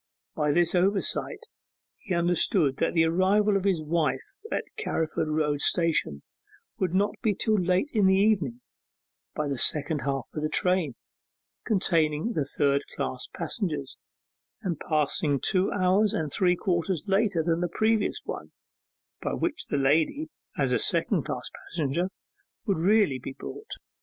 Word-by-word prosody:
By 150 -1 0
this 170 +2 +2
oversight 190 +2 +1 0.6
he 185 - -3
understood 170 - +2
that - - 0
the 165 -1 +4
arrival 195 +5 +2
of 195 -1 0
his 180 -6 +1
wife 170 - -2
at - - -1
Carriford 160 - -2
Road 150 -2 0
Station 160 - +1 0.6
would 185 -1 0
not 200 +2 +2
be 210 -3 +1
till 220 - 0
late 185 - +1
in 210 -4 +4
the 190 - +5
evening: 185 - +1 0.7
by 150 - -1
the 140 -3 -2
second 150 +1 +3
half 135 -2 -2
of 155 - -4
the 155 - -1
train, 180 -8 +1 0.7
containing 165 -1 +1
the 150 - -1
third 140 0 +1
class 130 -2 -3
passengers, 160 - -3 0.7
and 175 -6 -2
passing 150 -1 +1
two 185 +6 +2
hours 195 +2 +2
and 155 -3 -2
three 180 -1 +3
quarters 175 -2 -1
later 195 -4 +1
than 165 +1 0
the 175 - -1
previous 220 +3 0
one, 75 - -7 0.7
by - - -2
which - - -2
the - - -1
lady, 155 - +1 0.3
as - - +1
a - - +2
second - - +2
class - - -4 0.2
passenger, 165 +4 -1 0.6
would 195 -7 0
really 195 -6 +3
be 130 - -7
brought. 430 - -9
170 Hz, 150 wpm, -27 LUFS, 150-195 Hz, 0.7 s, the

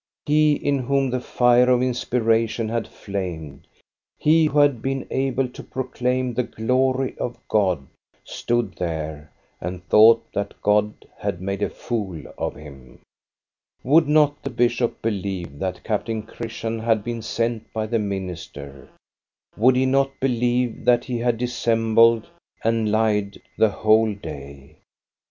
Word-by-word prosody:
He 150 0 +4
in 140 -1 0
whom 135 +1 0
the 125 - 0
fire 125 0 +3
of 125 0 +3
inspiration 115 -3 0
had 115 0 -2
flamed, 90 -8 -6 0.5
he 160 +1 +4
who 150 - -2
had 145 -5 +4
been 135 +1 -2
able 135 -1 0
to - - -10
proclaim 125 -1 -2
the 125 - +1
glory 130 +3 0
of 120 - -3
God, 95 -10 +1 0.4
stood 120 -5 -2
there 80 -3 -4 0.3
and 90 0 -6
thought 115 +2 +6
that 100 0 -4
God 105 0 +1
had 85 - -3
made 100 +2 -4
a - - +1
fool 100 -8 -4 0.2
of - - -3
him. 70 -4 -13 0.8
Would 155 +4 +4
not 150 -1 +3
the 140 - -4
bishop 120 0 0
believe 95 -8 -3
that 90 +1 -4
Captain 110 0 -2
Chris 115 +1 -8
tian 115 0 -2
had 110 -2 +1
been 120 -1 -4
sent 115 0 -2
by 110 -1 -2
the 115 +1 0
minister? 90 -9 -6 0.7
Would 125 +4 +4
he 130 +1 +2
not 135 +1 +1
believe 125 -2 0
that 120 -1 +4
he 125 -3 -3
had 120 -1 +1
dissembled 115 -1 +2 0.4
and 115 -1 +1
lied 105 -2 +1 0.2
the 110 - +4
whole 110 +1 +3
day? 70 -7 -10
115 Hz, 140 wpm, -23 LUFS, 100-125 Hz, 0.8 s, thought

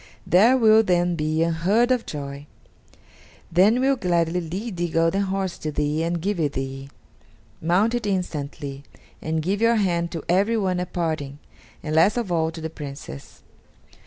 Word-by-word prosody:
There 225 +9 +5
will 220 -2 +6
then 175 -3 +1
be 155 0 0
unheard 185 +9 +2
of 250 -2 0
joy; 140 -1 -6 1.0
they 180 +4 +5
will 260 +4 +2
gladly 175 -5 0
lead 190 +6 -5
the 175 0 -1
golden 165 +4 +1
horse 190 -2 -2
to 155 - -3
thee 150 +1 -1
and 170 +1 -1
give 195 +2 -2
it 145 -3 0
thee. 135 +1 -5 0.7
Mount 185 +8 +2
it 240 -3 -2
instantly, 145 -7 -4 0.4
and 160 0 -2
give 200 +5 -1
your 230 0 +4
hand 175 -5 0
to 165 - -5
everyone 195 0 +1
at 180 - -4
parting, 155 -5 -3 0.5
and 155 - -3
last 170 +9 +4
of 230 -7 -2
all 160 -2 +1
to 165 0 -8
the 160 - -4
Princess. 140 - -9
170 Hz, 160 wpm, -23 LUFS, 155-200 Hz, 1.0 s, will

